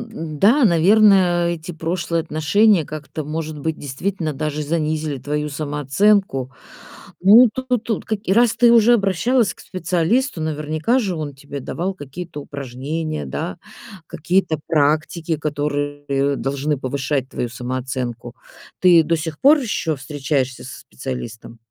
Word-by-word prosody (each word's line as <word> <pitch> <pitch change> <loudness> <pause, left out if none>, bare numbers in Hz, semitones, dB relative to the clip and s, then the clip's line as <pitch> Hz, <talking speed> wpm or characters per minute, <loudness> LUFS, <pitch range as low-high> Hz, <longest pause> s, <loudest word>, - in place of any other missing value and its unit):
н-да, 215 - +1
наверное, 180 -1 +4
эти 170 0 -5
прошлые 165 0 -2
отношения 165 +5 +3
как-то, 155 +1 -7
может 155 0 -4
быть, 160 +2 -3
действительно 155 +4 -3
даже 150 +1 -3
занизили 155 -2 -2
твою 150 +3 -3
самооценку. 145 +1 0 0.7
Ну, 220 +7 +8
тут 255 -3 -2
тут 225 - -2 0.2
и 190 - +2
раз 235 +2 +4
ты 235 0 +5
уже 235 +1 +6
обращалась 210 +2 +1
к - - -18
специалисту, 185 - -1
наверняка 155 - 0
же 200 -7 -1
он 150 -3 -5
тебе 140 +1 -8
давал 180 +8 -3
какие-то 165 0 -8
упражнения, 140 - -5
да, 65 - -4 0.5
какие-то 175 0 0
практики, 160 +2 +1
которые 145 -1 -2
должны 140 +3 -1
повышать 135 0 -2
твою 125 - -3
самооценку. 125 -1 -5 0.5
Ты 175 -3 +6
до 165 +2 +1
сих 155 -1 -5
пор 295 +3 +6
ещё 205 - -1
встречаешься 135 -1 -2
со 130 - -9
специалистом? 120 -3 -7
155 Hz, 125 wpm, -20 LUFS, 140-185 Hz, 0.7 s, Ну